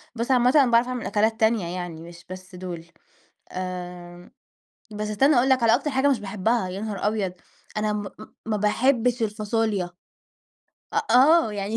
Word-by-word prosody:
بس 235 +3 -2
عامةً 250 0 +4
أنا 265 -5 +5
باعرف 235 +2 +4
أعمل 250 -2 -4
أكلات 220 +3 0
تانية 220 -5 +2
يعني، 175 -3 -6
مش 170 +1 -13
بس 185 0 -10
دول. 175 -2 -7 0.7
آمم 180 -1 -7 0.6
بس 210 0 -4
استنّى 270 +6 +3
أقول 255 +3 +3
لك 260 -2 +3
على 230 0 +5
أكتر 285 +4 -1
حاجة 265 +2 +2
مش 260 -6 +1
باحبها، 205 +1 -1
يا 190 +2 -6
نهار 210 -2 -3
أبيض! 205 -4 -1 0.4
أنا 215 0 0
م 210 0 -2 0.2
م 215 - -13
ما 215 -1 0
باحبش 240 +3 +1
الفاصوليا. 210 -3 -1 1.0
أ - - +1
آه. 280 -2 +5
يعني 205 +2 -3
215 Hz, 170 wpm, -24 LUFS, 185-240 Hz, 1.0 s, أنا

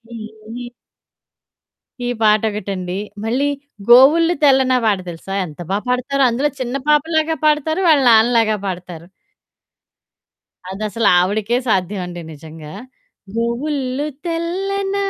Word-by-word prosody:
ఏ, - - -6 0.5
ఏ. 240 - -7 1.4
ఈ - - -1
పాటొకటండి. 205 -4 0 0.3
మళ్ళీ 260 +6 0 0.4
గోవుల్లు 300 +8 +6
తెల్లనా 265 -2 +4
పాట 205 -3 +2
తెలుసా? 170 +3 -9
ఎంత 155 +2 -12
బా 195 - +1
పాడతారో? 255 +3 0
అందులో 270 +6 0
చిన్న 250 +1 -2
పాపలాగా 315 +2 +1
పాడతారు. 305 +3 +1
వాళ్ళ 300 -4 +5
నాన్నలాగా 225 -1 +4
పాడతారు. 175 -2 -7 1.6
అదసలు 215 +3 -1
ఆవిడకే 210 +6 0
సాధ్యమండి 180 -3 -2
నిజంగా. 155 0 -11 0.6
గోవుల్లు 260 +4 -2 0.2
తెల్లన. 390 +4 -2
235 Hz, 100 wpm, -18 LUFS, 195-295 Hz, 1.6 s, గోవుల్లు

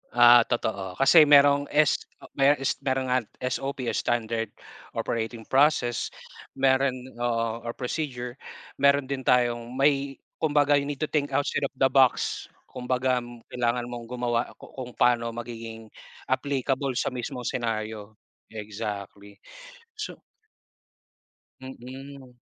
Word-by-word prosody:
Ah, 120 -1 +8
totoo. 100 -6 -2
Kasi 150 +3 +6
merong 145 0 +6
S 150 -1 +4 0.4
mero 140 +2 +6
S 135 - -1
merong, 130 -1 -1
ah, 130 - +4 0.2
SOP 135 +1 -2
o - - -6
Standard 115 -1 -1 0.5
Operating 115 0 -3
Process. 135 -3 +2 0.5
Meron 135 0 +2 0.2
oo, 115 -1 -1
or 115 0 -5
procedure. 125 -2 -4 0.4
Meron 140 -1 +4
din 130 -1 -3
tayong 120 -1 +2
may 140 0 +2 0.2
kumbaga, 145 -2 +3
you 140 - -4
need 145 0 -5
to - - -1
think 145 -2 0
outside 140 -1 0
of - - -29
the 135 0 +3
box. 130 -2 +2 0.2
Kumbaga, 125 0 0 0.3
kailangan 120 0 -1
mong 120 -1 -7
gumawa 120 -1 0
ku - - -14
kung 125 -2 -7
paano 120 -1 +2
magiging 115 -1 -7 0.4
applicable 135 -1 0
sa - - 0
mismong 125 0 -5
scenario. 110 -3 -3 0.4
Exactly. 105 -2 -7 0.6
So 425 - -6 1.4
Mm. 130 0 -10
125 Hz, 125 wpm, -26 LUFS, 115-135 Hz, 1.4 s, Ah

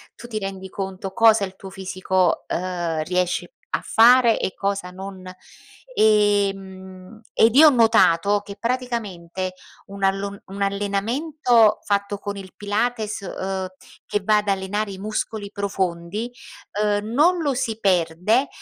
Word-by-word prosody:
tu 240 - -11
ti 215 -2 -3
rendi 190 -1 -6
conto, 190 0 -5
cosa 225 0 +5
il 190 -1 -5
tuo 195 - -9
fisico, 185 -1 -1
ehm, 175 -3 -2
riesce 180 - -1 0.2
a - - -3
fare 235 0 +5
e 190 - -2
cosa 195 -2 -2
non 190 0 -9 0.6
e, 205 - +4
mhmm, 190 +1 -12
ed 225 +1 +4
io 310 +1 +10
ho - - +9
notato 205 -5 +4
che 200 0 -10
praticamente, 205 -8 -3 0.3
un 200 0 -10
allon 195 +1 -1
un 200 +1 -8
allenamento 220 +5 +2
fatto 200 0 -1
con 205 -1 -5
il 190 -1 -10
Pilates, 215 +1 -2
ehm, 190 0 -4 0.4
che 205 - -1
va 210 +2 +3
ad 210 0 -1
allenare 200 +2 -1
i 190 - -8
muscoli 215 0 -4
profondi, 195 +2 -3 0.5
ehm, 205 0 +1
non 335 +7 +3
lo 285 -3 0
si 225 -3 -2
perde 185 - +2
200 Hz, 140 wpm, -22 LUFS, 190-220 Hz, 0.6 s, io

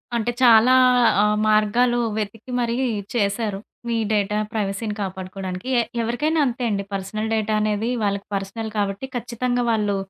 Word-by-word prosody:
అంటే, 235 +1 0
చాలా 230 +1 +7 0.5
ఆహ్, 210 0 +3
మార్గాలు 215 +3 +3 0.2
వెతికి 220 +3 -5
మరి 235 -1 0 0.4
చేశారు 205 -2 -1 0.3
మీ 230 - 0
డేటా 210 0 +1
ప్రైవసీని 210 0 -2
కాపాడుకోడానికి. 190 +1 -5
ఎ - - +4 0.2
ఎవరికైనా 295 +8 0
అంతే 250 -1 -2
అండి 200 -2 -1
పర్సనల్ 195 +3 -3
డేటా 215 -1 0
అనేది 215 +2 0
వాళ్ళకి 200 -1 -1
పర్సనల్ 200 +3 -4
కాబట్టి 200 +4 -1
ఖచ్చితంగా 245 +1 -1
వాళ్ళు 210 -2 +1
215 Hz, 135 wpm, -22 LUFS, 200-235 Hz, 0.5 s, చాలా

